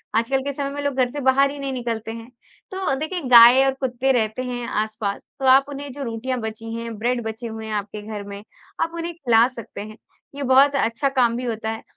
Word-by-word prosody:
आजकल 235 +4 +1
के 280 - -2
समय 275 0 -3
में 285 +1 -5
लोग 285 -1 -1
घर 255 -2 +2
से 290 - -5
बाहर 275 +1 +3
ही 290 - -8
नहीं 275 -1 -3
निकलते 230 -3 -4
हैं। 230 +1 -9 0.4
तो 380 -6 -1
देखिए, 345 +4 -3
गाय 240 +2 +9
और 270 - +2
कुत्ते 260 0 0
रहते 220 -1 0
हैं 245 -1 -4
आसपास, 215 -1 -2 0.2
तो 270 - -2
आप 265 +1 +6
उन्हें 285 0 -7
जो 280 +2 -6
रोटियाँ 245 +2 -3
बची 220 +1 -6
हैं, 230 -1 -6
ब्रेड 240 +2 0
बचे 225 +2 -5
हुए 220 0 -7
हैं 220 - -5
आपके 210 0 -4
घर 210 -2 -5
में, 200 0 -8 0.4
आप 330 - 0
उन्हें 335 +1 -4
खिला 235 -8 +4
सकते 235 -6 -9
हैं। 215 +1 -9 0.4
ये 285 - -4
बहुत 275 +2 +5
अच्छा 270 +1 +1
काम 235 -2 +3
भी 250 - -4
होता 225 -2 -3
है 225 - -7
245 Hz, 230 wpm, -22 LUFS, 225-275 Hz, 0.4 s, गाय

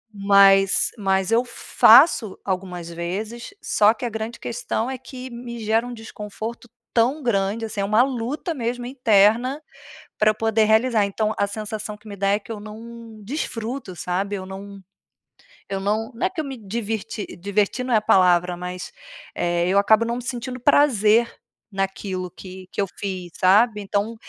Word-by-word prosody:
Mas 195 -1 +5
mas 195 0 0
eu 235 +2 +4
faço 235 - +5
algumas 180 -3 -4
vezes, 195 - -5
só 210 +2 +3
que 245 - -5
a - - -1
grande 220 +1 -5
questão 235 0 -3
é 265 - -3
que 260 0 -9
me 235 0 -7
gera 225 +2 +1
um 245 - -6
desconforto 225 +1 -8 0.2
tão 255 +6 +2
grande, 210 0 0
assim, 210 -2 -4
é - - 0
uma 215 +4 +4
luta 270 - -3
mesmo, 245 -2 -3
interna, 245 +1 +3 0.6
pra 215 - +4
eu 215 - -1
poder 225 0 +2
realizar. 220 -1 +3
Então, 215 +2 -1
a 200 - +2
sensação 215 +1 -5
que 215 +1 -23
me 205 - -7
dá 195 0 -1
é 200 +1 +3
que 225 +2 -9
eu 210 - -7
não 225 0 -11
desfruto, 235 - -4
sabe. 195 +4 -2
Eu 185 - -6
não 195 +1 -9 0.9
eu 195 0 -3
não 215 +5 -1
não 235 +10 0
é - - -5
que 370 -3 -8
eu 310 - -1
me 270 -2 -6
diverti 220 0 -4
diverti 200 +6 -1
não 255 - -4
é 220 - +6
a - - +1
palavra, 180 -3 +3
mas 180 +1 -6 0.4
eh, 175 0 0
eu 195 +2 +4
acabo 220 +3 +4
não 235 +2 -2
sentindo 250 +1 -5
prazer 235 -5 +3 0.4
naquilo 190 -1 -3
que 185 +1 -11
que - - -7
eu 200 - +3
fiz, 185 -3 -5
sabe. 210 +3 +4
Então, 205 +3 -2
215 Hz, 175 wpm, -22 LUFS, 195-235 Hz, 0.9 s, é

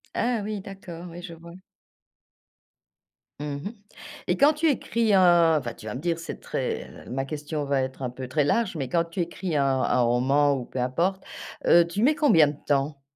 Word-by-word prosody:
Ah 235 -2 0
oui, 210 0 -4
d'accord, 185 -3 -9
oui, 175 +1 -9
je 170 - -8
vois. 170 +1 -13 1.9
Mmh 150 - -4 0.2
mh, 205 - -3 0.6
et - - +1
quand 290 +2 +5
tu 320 +2 0
écris 235 -5 +1
un 175 -3 +5
enfin, 125 -5 -4
tu 110 - -12
vas 105 - -4
me - - -4
dire, 170 -1 -1
c'est 165 - -7
très - - -3 0.2
ma 135 +1 -2
question 150 +1 -4
va 140 -1 +1
être 130 0 -5
un 125 - -2
peu 130 +1 -7
très 140 +4 +1
large, 185 +7 +1
mais 135 -5 -3
quand 170 +4 +1
tu 170 +2 -4
écris 170 0 -3
un 140 -1 +2 0.2
un 125 - +2
roman 135 +4 +3
ou 125 -3 -5
peu 130 - -6
importe, 170 +10 0 0.4
heu, 170 0 +6
tu 200 +6 -2
mets 295 +4 +4
combien 215 - +5
de 145 - -6
temps? 140 0 0
165 Hz, 200 wpm, -25 LUFS, 135-190 Hz, 1.9 s, heu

